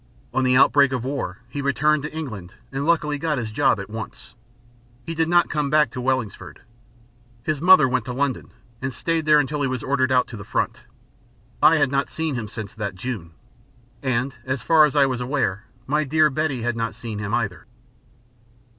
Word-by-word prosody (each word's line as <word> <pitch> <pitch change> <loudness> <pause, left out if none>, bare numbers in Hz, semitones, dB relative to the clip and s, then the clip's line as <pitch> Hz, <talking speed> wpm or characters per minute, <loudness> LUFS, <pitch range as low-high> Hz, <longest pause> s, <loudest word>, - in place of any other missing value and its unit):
On 130 - +1
the 125 0 +4
outbreak 140 0 +5
of 125 -3 -2
war 140 +1 -3
he 140 +3 -5
returned 150 +2 +2
to 150 - -5
England 110 - -7 0.2
and 140 +2 -3
luckily 150 -3 +1
got 155 -1 -1
his 115 -3 -3
job 135 -1 +2
at 100 - -6
once. 110 -1 -8 0.7
He 165 - -4
did 160 0 0
not 175 0 +4
come 150 -2 0
back 150 -4 +3
to 125 - -5
Wellingsford. 115 - -3 0.8
His 155 0 -2
mother 185 -4 +7
went 125 -2 -1
to - - -4
London 135 0 -2 0.3
and 130 0 -2
stayed 165 +5 -2
there 150 -1 +6
until 145 +1 -1
he 140 - +1
was 130 -3 -3
ordered 130 -1 +1
out 125 -1 +4
to 115 - -8
the 100 - -8
front. - - -2 0.8
I 155 +2 +7
had 145 -4 +2
not 140 0 0
seen 160 -2 -2
him 120 -4 -4
since 105 -1 -7
that 100 -3 -4
June. 95 -6 -6 0.7
And, 130 0 -1
as 130 -2 -3
far 160 +1 +6
as 150 - -2
I 145 - +6
am 130 -2 0
aware, 120 -6 -1 0.2
my 150 +4 +1
dear 155 +1 +3
Betty 135 -4 -1
had 120 -1 -1
not 115 0 -3
seen 110 -3 -6
him 105 0 -4
either. 110 -7 -3
130 Hz, 200 wpm, -23 LUFS, 115-150 Hz, 0.8 s, mother